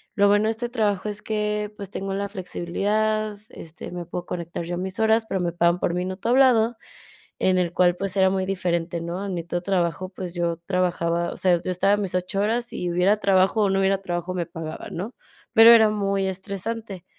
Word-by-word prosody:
Lo 200 -1 +4
bueno 205 +1 +4
de 220 - +2
este 235 +2 -4
trabajo 210 -5 0
es 210 0 -5
que, 210 -1 -2
pues 200 -2 -7
tengo 195 -1 -4
la 200 +1 -2
flexibilidad, 210 +3 -1
este, 160 -1 -10
me 175 -1 -5
puedo 175 +1 -5
conectar 170 -1 -5
yo 175 - -3
a - - -4
mis 190 +2 -4
horas, 220 0 +3
pero 190 - -1
me 175 -1 -1
pagan 170 +1 +2
por 170 - 0
minuto 185 +4 -3
hablado, 240 -3 +4 0.6
en 185 -1 +2
el 175 -2 0
cual, 180 -1 +3
pues, 195 0 -3
era 190 -1 +4
muy 190 -1 -1
diferente, 170 -3 -1
¿no? 170 +4 -4
En 190 - -3
mi 170 - -2
otro 175 +1 -3
trabajo, 185 -1 -1
pues, 185 -2 -7
yo 170 -1 -1
trabajaba, 170 -2 0
o - - -8
sea, 180 -2 +2
yo - - -3
estaba 195 +3 +3
a - - +2
mis 195 -3 -3
8 180 +2 -1
horas, 235 +3 0
y 175 -1 -3
hubiera 185 +4 +3
trabajo 195 +2 +3
o 200 - +2
no 195 0 +2
hubiera 195 0 +2
trabajo, 175 0 -3
me 175 -2 -2
pagaban, 165 -2 -7
¿no? 205 +8 -5 0.4
Pero 225 0 +9
era 220 -2 +7
muy 200 -2 0
estresante. 195 +1 -5
190 Hz, 215 wpm, -24 LUFS, 175-210 Hz, 0.6 s, Pero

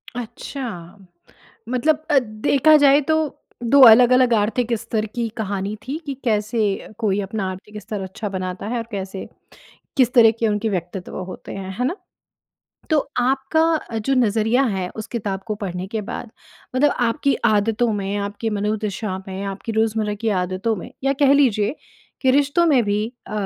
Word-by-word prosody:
अच्छा! 225 - -7 0.7
मतलब 300 +5 +1
अ, 285 - +6
देखा 255 +6 +3
जाए 285 0 +5
तो 315 - +4 0.5
दो 275 +4 +5
अलग-अलग 250 +2 +6
आर्थिक 225 +3 +1
स्तर 220 -1 -2
की 235 -1 -1
कहानी 200 -1 -3
थी 285 - -2
कि 280 - -3
कैसे 215 -1 0 0.4
कोई 205 -3 +1
अपना 195 -1 -3
आर्थिक 210 +3 -9
स्तर 210 0 -5
अच्छा 190 +3 -5
बनाता 185 +1 -4
है 240 +2 -2
और 230 -1 -4
कैसे, 195 -1 -5 0.7
किस 250 -3 +3
तरह 230 -3 +8
के 230 - +2
उनके 210 +1 0
व्यक्तित्व 180 -1 -4
होते - - -9
हैं 190 +5 -4
ना? 345 - -2 0.9
तो 310 - +4 0.2
आपका 270 +1 +1
जो 245 +5 0
नज़रिया 230 +1 +2
है 185 -2 -2
उस 220 0 -5
किताब 200 -5 -3
को 215 - -2
पढ़ने 180 -2 -4
के 220 - -1
बाद 235 - -6 0.5
मतलब 290 +3 +4
आपकी 260 +4 +1
आदतों 220 +2 +2
में, 200 -1 -2
आपकी 205 +2 -3
मनोदशा 210 -1 -2
में, 190 +1 -5
आपकी 195 +3 -5
रोज़मर्रा 220 -1 0
की 225 +2 -3
आदतों 185 +5 -1
में 180 - -8
या 275 - +3
कह 275 -1 +6
लीजिए 235 -4 +2 0.5
कि 260 - +4
रिश्तों 285 +5 +3
में 275 -7 +4
भी 210 +1 0 0.2
अ, - - -9
220 Hz, 160 wpm, -21 LUFS, 200-255 Hz, 0.9 s, तरह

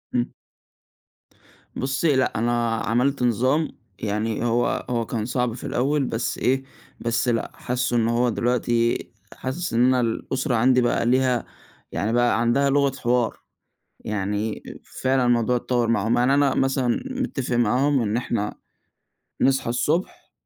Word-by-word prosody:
إمم. 120 0 0 1.4
بُصّي 135 +3 +1
لأ 130 -4 +1
أنا 120 0 +1
عملت 125 +4 0
نظام 130 +7 +2 0.3
يعني 110 +2 -2
هو 120 +1 0
هو 115 -2 0
كان 110 -2 -3
صعب 125 -1 -1
في 120 - -9
الأول 140 +3 +1
بس 115 0 -2
إيه، 130 +1 +1 0.4
بس 115 +2 0
لأ 115 -2 0
حاسّه 125 0 -2
إن 115 -1 +2
هو 120 +1 +2
دلوقتي 120 0 +1 0.4
حاسس 160 +4 -4
إن 120 +2 +4
أنا 130 0 +3
الأسرة 120 +2 -1
عندي 125 +2 +4
بقى 120 -1 +1
ليها 125 -1 +2 0.5
يعني 110 +3 -1
بقى 120 -1 +2
عندها 135 +4 +2
لغة 140 0 +3
حوار، 120 -1 +1 0.6
يعني 105 +1 -3 0.4
فعلًا 130 -1 +2
الموضوع 120 0 +2
اتطوّر 120 -1 0
معاهم، 115 +1 +1
يعني 125 +3 +3
أنا 140 -1 +3
مثلًا 135 - +1 0.2
متفق 130 - -2
معاهم 130 +4 +2
إن 110 0 0
إحنا 115 -4 -2 0.9
نصحى 135 -3 +2
الصبح 170 - -1
120 Hz, 140 wpm, -23 LUFS, 115-130 Hz, 1.4 s, إن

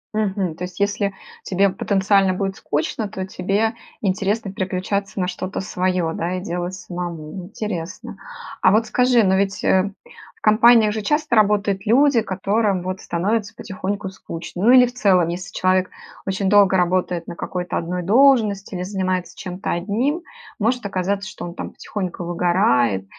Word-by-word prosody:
Мгм. 195 -5 -1
То 175 - -7
есть 180 +1 -7
если 200 0 0 0.3
тебе 195 +1 +2
потенциально 195 0 +2
будет 195 0 -2
скучно, 200 +9 -2
то 190 -1 -5
тебе 200 +5 0 0.3
интересно 200 +1 -1
переключаться 195 0 -2
на 180 - 0
что-то 185 +1 -4
свое, 180 -2 -1
да, 175 +2 -2
и - - -5
делать 175 0 -3
самому. 175 -4 -6 0.2
Интересно. 185 -5 -5 0.5
А 185 - +5
вот 220 +1 +3
скажи, 250 -2 +3
но 190 0 +3
ведь, 195 0 0
э, 190 +1 +3 0.5
в - - -29
компаниях 220 0 +5
же 220 - -3
часто 295 +3 0
работают 205 -1 +2
люди, 255 +1 +4
которым 195 0 0
вот 185 +1 -4
становится 205 +5 -1
потихоньку 195 0 -4
скучно. 175 -1 -7
Ну, 235 - +6
или 250 -1 +8
в 245 - -6
целом, 190 -8 +3
если 180 +1 -5
человек 185 0 +1 0.4
очень 195 0 -1
долго 200 -2 +5
работает 180 -1 0
на 170 - -6
какой-то 180 0 -3
одной 180 +2 -3
должности 215 -2 +3
или 180 0 -3
занимается 185 -2 -2
чем-то 180 0 -5
одним, 230 - -1 0.4
может 235 +1 0
оказаться, 195 0 -2
что - - -9
он 170 - -8
там - - -6
потихоньку 185 -3 -5
выгорает 170 - +2
195 Hz, 160 wpm, -21 LUFS, 180-210 Hz, 0.5 s, или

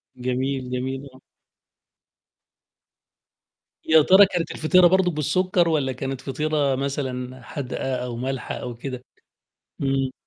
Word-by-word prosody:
جميل، 130 +1 -2
جميل. 130 +2 -4
آه. 130 - -17 2.6
يا 160 0 +6
ترى 190 +6 +7
كانت 175 -4 -3
الفطيرة 180 +3 +4
برضه 185 0 +3
بالسُكّر، 175 +3 +1
والَّا 145 -5 +1
كانت 135 0 -5
فطيرة 145 0 0
مثلًا 130 -2 -4
حادقة 130 0 -4
أو 125 -1 -4
مالحة 130 +2 -4
أو 125 -1 -6
كده؟ 125 +1 -7 0.8
إمم. 135 -1 0
135 Hz, 110 wpm, -23 LUFS, 130-155 Hz, 2.6 s, ترى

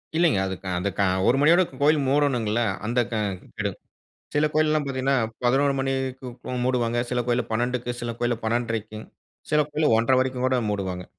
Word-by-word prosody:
இல்லைங்க, 165 - +3
அது 95 - -3
க 95 - -8
அந்த 100 +3 -1
க - - +4 0.3
ஒரு 125 - +4
மணியோட 170 +5 +5 0.2
கோயிலு 150 +1 +4
மூடனுங்கல்ல! 125 -6 +1 0.2
அந்த 120 +2 0
க - - -2 0.4
கடும் - - -2 0.6
சில 150 +1 +3
கோயில்லலாம் 155 -1 +2
பாத்தீங்கனா 135 0 0 0.3
11 135 +3 +3
மணிக்கு 130 -2 -3
மூடுவாங்க, 120 -2 +1
சில 125 0 +1
கோயில்ல 120 0 +1
12க்கு, 120 +1 -1
சில 120 -1 -3
கோயில்ல 120 -1 0
12:30 110 -2 -2 0.4
சில 150 0 +4
கோயில்ல 150 -4 +2
1:30 115 +3 +1
வரைக்கும் 130 -1 0
கூட 130 -1 +2
மூடுவாங்க. 95 -3 -3
125 Hz, 160 wpm, -24 LUFS, 115-140 Hz, 0.6 s, மணியோட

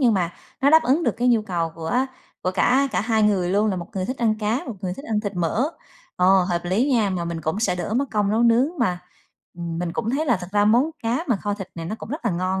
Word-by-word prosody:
nhưng 240 -5 +4
mà 175 -2 0 0.3
nó 280 +1 +4
đáp 320 0 +7
ứng 290 +7 +2
được 235 - +1
cái 245 +2 +1
nhu 230 -3 +4
cầu 170 -5 -2
của 165 +5 -2 0.5
của 185 - 0
cả 255 +9 +3
cả - - +1
hai 220 0 +1
người 195 -4 +2
luôn, 210 +2 +2
là 190 - -2
một 175 - -5
người 190 -1 -1
thích 255 +7 -3
ăn 225 -2 +2
cá, 220 +5 0
một 240 - -5
người 180 -3 -3
thích 275 - -10
ăn 215 -5 0
thịt 205 -2 -4
mỡ. 195 - 0 0.5
Ồ, 185 +1 +5
hợp 175 -1 -1
lý 210 +11 +1
nha, 215 -5 +2
mà 180 -2 -2
mình 170 -1 -4
cũng 160 +6 -2
sẽ 225 - +1
đỡ 180 +4 -3
mất 265 +4 +2
công 205 -2 +1
nấu 225 +3 +2
nướng 235 +4 +4
mà, 180 -7 +1 0.6
ừm, 170 -1 -5
mình 175 -1 -2
cũng 230 - -2
thấy 300 +5 0
là 240 - +3
thật 180 - -7
ra 205 0 +3
món 240 +9 +4
cá 235 +8 -1
mà 240 - +3
kho 205 +1 -2
thịt 195 -2 -7
này 165 -1 -6
nó 210 - -3
cũng - - -9
rất 290 +2 -5
là 230 - +2
ngon 185 +2 -1
210 Hz, 285 wpm, -23 LUFS, 180-240 Hz, 0.6 s, đáp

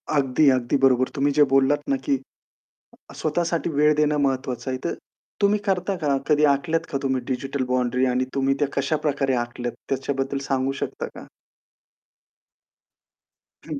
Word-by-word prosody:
अगदी, 140 0 +3
अगदी 130 +1 +1
बरोबर 130 -1 +3
तुम्ही 145 +1 +2
जे 150 +1 +5
बोललात 135 +2 +3
ना, 135 - +3
की 135 +1 0 1.0
अ, - - -11
स्वतःसाठी 170 +2 -1
वेळ 150 0 +3
देणं 150 0 +2
महत्त्वाचं 130 -1 -2
आहे, 130 - -2
तर 170 - -1 0.5
तुम्ही 200 +1 +4
करता 190 -1 0
का? 140 -2 +2
कधी 150 -1 +3
आखल्यात 165 +3 -2
का 135 - -1
तुम्ही 130 -1 0
डिजिटल 135 +1 -2
बाउंडरी 125 0 +1
आणि 125 0 +1
तुम्ही 135 0 +2
त्या 145 - +1
कशाप्रकारे 140 -1 0
आखल्यात 120 0 -5 0.2
त्याच्याबद्दल 135 0 -2
सांगू 135 0 0
शकता - - -3
का? - - -10 2.4
हं. 155 -3 -4
140 Hz, 150 wpm, -23 LUFS, 130-150 Hz, 2.4 s, जे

